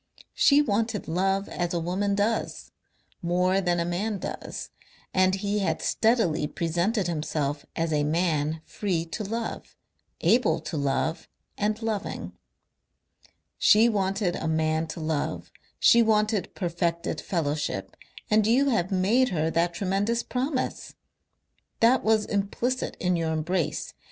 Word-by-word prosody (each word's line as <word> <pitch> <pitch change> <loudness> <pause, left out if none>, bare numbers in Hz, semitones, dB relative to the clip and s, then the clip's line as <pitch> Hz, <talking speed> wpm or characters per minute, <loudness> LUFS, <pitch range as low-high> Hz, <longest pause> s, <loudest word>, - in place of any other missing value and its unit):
She 290 +1 +5
wanted 220 -3 -1
love 195 +4 0
as 175 -1 -2
a - - +1
woman 190 +4 0
does, 210 +3 -1 0.5
more 180 +2 +2
than 175 -2 +1
a 170 - 0
man 200 +5 -1
does, - - -6 0.4
and 185 0 +3
he 200 +1 -1
had 195 - 0
steadily 220 -10 +2
presented 175 +7 0
himself 150 -3 -2
as 165 -1 -1
a 150 -1 +2
man 155 -1 0
free 180 -6 -2
to 190 +6 -5
love, 225 +3 -5 0.5
able 245 +1 +3
to 170 - -6
love 145 +3 -1 0.3
and 210 +1 -1
loving. 215 -3 -3 1.3
"She 220 +3 +6
wanted 195 -3 0
a 160 - -3
man 160 0 +1
to 160 - -7
love, 155 -2 -2 0.3
she 235 - +6
wanted 215 -2 +1
perfected 170 -2 -2
fellowship, 145 - -2 0.4
and 215 0 +4
you 265 +5 +4
have 205 -7 0
made 215 +8 +3
her 160 -3 0
that 170 +1 +1
tremendous 205 +5 0
promise. 260 +1 -3 0.8
That 240 +3 +4
was 220 -1 +3
implicit 220 +6 -2
in 180 -1 +1
your 165 -1 -1
embrace. 160 +2 -1
185 Hz, 130 wpm, -26 LUFS, 165-215 Hz, 1.3 s, She